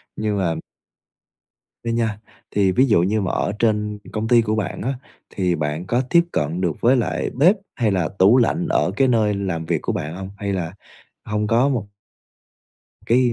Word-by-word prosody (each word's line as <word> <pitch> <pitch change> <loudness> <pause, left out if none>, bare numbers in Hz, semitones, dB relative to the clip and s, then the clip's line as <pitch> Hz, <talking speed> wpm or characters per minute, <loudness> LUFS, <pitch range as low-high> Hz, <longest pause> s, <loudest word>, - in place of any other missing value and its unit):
nhưng 105 -2 -1
mà 85 -4 0 1.3
á 115 - -1
nha, 115 -3 -1 0.3
thì 100 -2 +2
ví 130 +7 +4
dụ 105 -9 +4
như 105 +4 +1
mà 95 - -2
ở - - -1
trên 105 -2 0
công 110 +1 -2
ty 120 -1 +5
của 110 -1 -1
bạn 105 -5 -3
á, 130 +6 -1 0.4
thì 90 -2 0
bạn 75 +2 -3
có 120 +6 +1
tiếp 170 - +6
cận 75 +4 -1
được 85 -5 -1
với 125 +3 +4
lại 120 - -1
bếp 175 - +5 0.2
hay 115 -4 +1
là 90 -5 0
tủ 100 +6 +6
lạnh 165 +8 +1
ở - - +2
cái 135 -1 +3
nơi 110 -4 +2
làm 95 -5 -3
việc 80 -2 -1
của - - -1
bạn 80 +2 -4
hông? 95 0 -7
Hay 100 -1 -3
là 85 -3 -3 0.5
hông 105 -1 -1
có 115 +5 +3
một 120 -8 -1 1.2
Cái 125 +1 +3
105 Hz, 195 wpm, -21 LUFS, 95-120 Hz, 1.3 s, tiếp